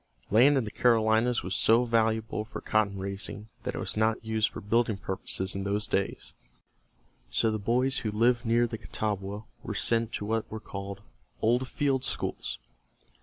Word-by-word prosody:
Land 130 Hz, +7 st, +6 dB
in 130 Hz, -, +2 dB
the 105 Hz, -, -6 dB
Carolinas 115 Hz, 0 st, +3 dB
was 90 Hz, +2 st, -3 dB
so 115 Hz, +2 st, +4 dB
valuable 110 Hz, -2 st, +1 dB
for 110 Hz, -, -7 dB
cotton 105 Hz, -2 st, +1 dB
raising 100 Hz, +2 st, -5 dB
that -, -, -4 dB
it -, -, -3 dB
was -, -, -3 dB
not 110 Hz, +1 st, +1 dB
used 110 Hz, 0 st, +1 dB
for -, -, -8 dB
building 115 Hz, 0 st, +1 dB
purposes 95 Hz, 0 st, -3 dB
in 95 Hz, -, -3 dB
those 100 Hz, +2 st, 0 dB
days, 100 Hz, -3 st, -2 dB, 1.0 s
so 110 Hz, -, +2 dB
the 110 Hz, -, -2 dB
boys 125 Hz, +6 st, +1 dB
who 110 Hz, -, -2 dB
lived 120 Hz, +3 st, +2 dB
near 120 Hz, 0 st, +3 dB
the 115 Hz, -1 st, -5 dB
Catawba 105 Hz, -1 st, -3 dB, 0.2 s
were -, -, -5 dB
sent 115 Hz, -1 st, +2 dB
to 105 Hz, -, -3 dB
what 110 Hz, +1 st, -1 dB
were 110 Hz, -, -5 dB
called 100 Hz, -1 st, -7 dB, 0.4 s
"old 125 Hz, +3 st, +3 dB
field 135 Hz, -2 st, 0 dB
schools." -, -, -2 dB
110 Hz, 170 wpm, -29 LUFS, 105-115 Hz, 1.0 s, Land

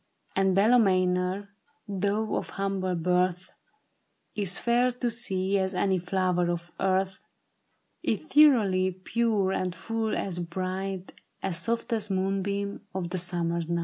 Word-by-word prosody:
And 190 Hz, -1 st, +3 dB
Bella 220 Hz, +6 st, +5 dB
Maynor, 185 Hz, -1 st, +1 dB, 0.4 s
though 205 Hz, +2 st, -1 dB
of -, -, -3 dB
humble 195 Hz, -2 st, -1 dB
birth, 180 Hz, +1 st, 0 dB, 0.8 s
Is 200 Hz, -3 st, 0 dB
fair 245 Hz, +1 st, +2 dB
to 245 Hz, -1 st, -2 dB
see 195 Hz, -4 st, 0 dB
as 190 Hz, 0 st, -1 dB
any 190 Hz, 0 st, +2 dB
flower 180 Hz, -1 st, 0 dB
of 175 Hz, 0 st, -3 dB
earth, 190 Hz, 0 st, +1 dB, 0.8 s
Ethereally 230 Hz, -12 st, +4 dB
pure, 200 Hz, +1 st, 0 dB
and 185 Hz, -2 st, -1 dB
full 225 Hz, -1 st, -2 dB
as 180 Hz, -3 st, -3 dB
bright 185 Hz, +2 st, -4 dB, 0.3 s
As 185 Hz, -3 st, 0 dB
softest 225 Hz, +2 st, -1 dB
moonbeam 195 Hz, +1 st, -1 dB
of 175 Hz, -1 st, -3 dB
a -, -, 0 dB
summer's 170 Hz, -1 st, -1 dB
night. 170 Hz, 0 st, 0 dB
190 Hz, 125 wpm, -27 LUFS, 180-200 Hz, 0.8 s, Bella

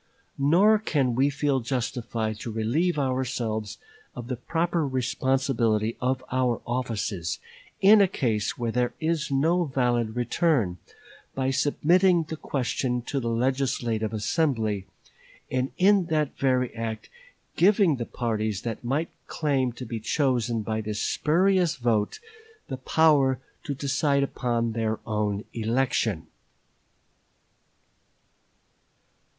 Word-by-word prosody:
Nor 185 Hz, +10 st, +5 dB
can 140 Hz, -, 0 dB
we 135 Hz, +4 st, +3 dB
feel 145 Hz, -1 st, 0 dB
justified 115 Hz, -3 st, -3 dB
to 115 Hz, -, -5 dB
relieve 135 Hz, +11 st, 0 dB
ourselves 125 Hz, -5 st, -2 dB, 0.4 s
of 120 Hz, 0 st, -7 dB
the 130 Hz, -, -1 dB
proper 165 Hz, +5 st, -1 dB
responsibility 125 Hz, -3 st, 0 dB
of 130 Hz, +1 st, 0 dB
our 125 Hz, -2 st, +1 dB
offices, 110 Hz, -9 st, -2 dB, 0.4 s
in 205 Hz, +2 st, +7 dB
a 195 Hz, -, +5 dB
case 110 Hz, -, -1 dB
where 120 Hz, -2 st, -2 dB
there 125 Hz, +1 st, 0 dB
is 160 Hz, -1 st, -1 dB
no 165 Hz, +6 st, +2 dB
valid 120 Hz, -5 st, 0 dB
return, 120 Hz, -, +1 dB, 0.6 s
by 135 Hz, 0 st, 0 dB
submitting 175 Hz, +6 st, +3 dB
the 160 Hz, +1 st, -6 dB
question 125 Hz, -4 st, -2 dB
to 140 Hz, -, -2 dB
the 120 Hz, -2 st, -2 dB
legislative 120 Hz, -3 st, 0 dB
assembly, 110 Hz, -, 0 dB, 0.6 s
and 130 Hz, +1 st, -1 dB
in 195 Hz, -1 st, +4 dB
that 155 Hz, -3 st, 0 dB
very 130 Hz, -2 st, +1 dB
act 115 Hz, -1 st, -5 dB, 0.5 s
giving 195 Hz, -5 st, +4 dB
the 120 Hz, -, -4 dB
parties 110 Hz, -4 st, -2 dB
that 115 Hz, 0 st, -4 dB
might 140 Hz, +7 st, -1 dB, 0.2 s
claim 135 Hz, -5 st, 0 dB
to 125 Hz, -, -8 dB
be 115 Hz, -1 st, -4 dB
chosen 120 Hz, -3 st, 0 dB
by 110 Hz, +1 st, -2 dB
this 105 Hz, 0 st, -4 dB
spurious 180 Hz, -, +2 dB
vote 115 Hz, -4 st, 0 dB, 0.5 s
the 130 Hz, -, -3 dB
power 140 Hz, -1 st, +3 dB, 0.3 s
to 145 Hz, -5 st, -3 dB
decide 140 Hz, +1 st, +1 dB
upon 120 Hz, -4 st, -1 dB
their 110 Hz, -1 st, -1 dB
own 105 Hz, -1 st, -1 dB
election." 115 Hz, -5 st, 0 dB
130 Hz, 120 wpm, -26 LUFS, 115-145 Hz, 0.6 s, in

